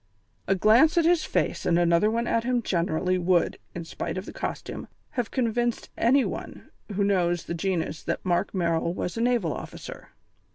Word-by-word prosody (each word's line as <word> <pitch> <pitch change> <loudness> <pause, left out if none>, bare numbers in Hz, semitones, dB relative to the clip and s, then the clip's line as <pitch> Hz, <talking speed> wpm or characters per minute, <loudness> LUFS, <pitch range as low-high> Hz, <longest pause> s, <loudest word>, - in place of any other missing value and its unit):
A 195 - +3
glance 230 - +5
at 335 - +4
his 335 -2 +3
face - - -1
and 170 - +2
another 175 +4 +3
one 230 +2 0
at 230 -1 +1
him 245 -1 0
generally 180 0 0
would, 175 -1 +1 0.2
in 170 -1 -5
spite 165 - -5
of 185 - -4
the - - -9
costume, - - -5 0.2
have 245 -3 -2
convinced 240 -1 -1
any 255 +3 +3
one - - -7 0.2
who 200 - +1
knows 175 -4 +1
the 170 - -5
genus 170 -2 -2
that - - -3
Mark 175 -1 +1
Merrill 170 -2 0
was 180 - -3
a 230 - -2
naval 235 -10 +1
officer. - - -9
195 Hz, 180 wpm, -26 LUFS, 175-235 Hz, 0.2 s, glance